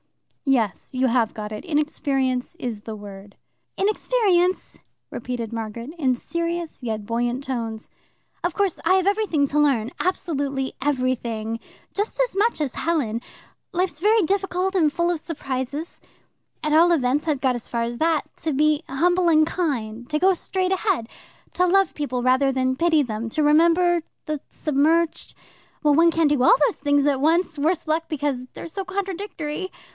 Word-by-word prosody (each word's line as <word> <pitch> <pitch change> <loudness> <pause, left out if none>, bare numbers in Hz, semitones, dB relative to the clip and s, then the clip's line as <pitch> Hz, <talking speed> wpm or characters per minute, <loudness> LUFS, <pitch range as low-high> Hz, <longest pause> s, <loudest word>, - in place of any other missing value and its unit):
"Yes. 230 - 0
You 260 +1 +2
have 230 -2 +1
got 210 -1 -6
it. 210 - -6
Inexperience 280 -4 -1
is 240 -10 -5
the 220 0 -7
word." 200 -1 -11 0.4
"Inexperience," 390 -3 +1 0.3
repeated 235 -2 -4
Margaret, 230 +3 -5
in 260 -5 +2
serious 335 +2 -4
yet 220 -3 -3
buoyant 240 +4 -1
tones. 230 -4 -4 0.6
"Of 350 - 0
course, 395 -3 0
I 375 - +4
have 380 0 +2
everything 400 -8 +2
to 295 +2 0
learn 255 -6 +2
absolutely 285 -7 -1
everything 245 -5 -1 0.3
just 415 +4 -2
as - - +1
much 430 +1 +2
as 290 -5 -2
Helen. 265 -9 -1 0.5
Life's 360 -4 -1
very 425 +3 +4
difficult 385 +1 0
and 315 -5 +3
full 340 +2 0
of 340 - -2
surprises. 285 -1 -5 0.6
At 305 0 +1
all 335 +3 +6
events, 290 -1 +1
I've 295 -4 +1
got 260 -1 +1
as 240 - -6
far 235 -1 -1
as 235 0 -4
that. 320 -1 +2
To 320 - -2
be 300 +2 +2
humble 350 +6 +2
and 310 -1 +5
kind, 245 -10 -3
to 300 0 0
go 380 +3 +5
straight 370 +1 -2
ahead, 375 - 0 0.5
to 360 - +2
love 385 0 +3
people 255 -4 -3
rather 260 +2 +3
than 260 0 0
pity 320 0 +3
them, 225 -2 -4
to 305 +7 0
remember 340 +3 +4 0.2
the 305 -2 -3
submerged 315 +3 +1 0.5
well, 295 -1 +5
one 335 +3 +5
can't 325 -2 +2
do 285 -4 +2
all - - +7
these - - -4
things 285 0 +2
at 275 -2 +1
once, 325 +1 +2
worse 325 +3 0
luck, 320 +1 0
because 285 -4 -2
they're - - -9
so 390 +4 -4
contradictory. 375 -3 -4
295 Hz, 165 wpm, -23 LUFS, 255-345 Hz, 0.6 s, all